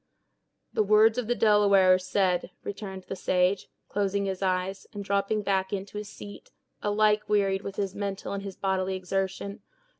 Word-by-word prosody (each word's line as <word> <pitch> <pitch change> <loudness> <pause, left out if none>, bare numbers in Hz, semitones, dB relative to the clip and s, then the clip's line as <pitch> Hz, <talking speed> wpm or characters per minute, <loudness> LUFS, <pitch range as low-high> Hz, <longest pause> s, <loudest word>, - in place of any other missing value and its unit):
"The - - +2
words 215 +3 +5
of 240 - -3
the 240 - +1
Delaware 200 -4 +5
are 185 - +3
said," 185 -1 0
returned 195 -2 -6
the 195 - -6
sage, 185 +1 +1 0.2
closing 200 0 0
his 190 -1 -3
eyes, 190 0 -1
and 205 -1 -5
dropping 200 +2 0
back 190 -1 0
into 200 +1 -4
his 210 -1 -7
seat, 205 -1 -11 0.3
alike 210 0 +2
wearied 195 -2 +2
with 200 -1 -6
his 195 -2 -2
mental 200 -1 -4
and 200 - -3
his 195 -2 -7
bodily 190 -1 -1
exertion. 195 +2 -3
195 Hz, 170 wpm, -27 LUFS, 190-205 Hz, 0.3 s, words